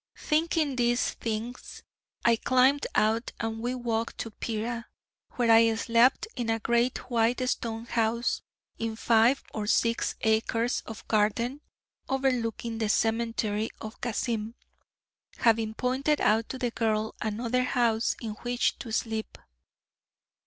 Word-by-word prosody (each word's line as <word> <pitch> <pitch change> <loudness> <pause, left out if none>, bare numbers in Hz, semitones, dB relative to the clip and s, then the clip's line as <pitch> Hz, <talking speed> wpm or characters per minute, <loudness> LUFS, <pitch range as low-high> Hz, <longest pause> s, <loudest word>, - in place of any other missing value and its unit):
Thinking 310 -3 0
these 240 0 +2
things 230 +2 -5 0.4
I 235 - +6
climbed 255 +4 +3
out, 220 +2 +1
and 225 0 -3
we 245 +2 -2
walked 230 -2 -2
to 225 - -6
Pera, 230 +2 -4 0.5
where 235 -2 +2
I 225 0 +6
slept 235 - +3
in 240 -3 -2
a 225 - +2
great 235 +3 0
white 240 +2 +2
stone 230 -2 -2
house 230 0 0 0.4
in 225 -1 -2
five 230 +4 +3
or 210 -1 -3
six 230 +1 +1
acres 225 +2 +1
of 220 -1 -9
garden 230 +6 +1 0.5
overlooking 240 -4 -1
the 220 -2 0
cemetery 225 -1 0
of 220 +1 -9
Kassim, 230 -1 -2 0.8
having 225 -2 +2
pointed 265 +5 +1
out 220 +1 +2
to 260 - -4
the 245 -2 -1
girl 220 -2 0
another 230 +3 0
house 235 -3 +1
in 225 -2 -4
which 245 0 0
to 230 - -7
sleep. 220 -1 -2
230 Hz, 130 wpm, -28 LUFS, 225-245 Hz, 0.8 s, I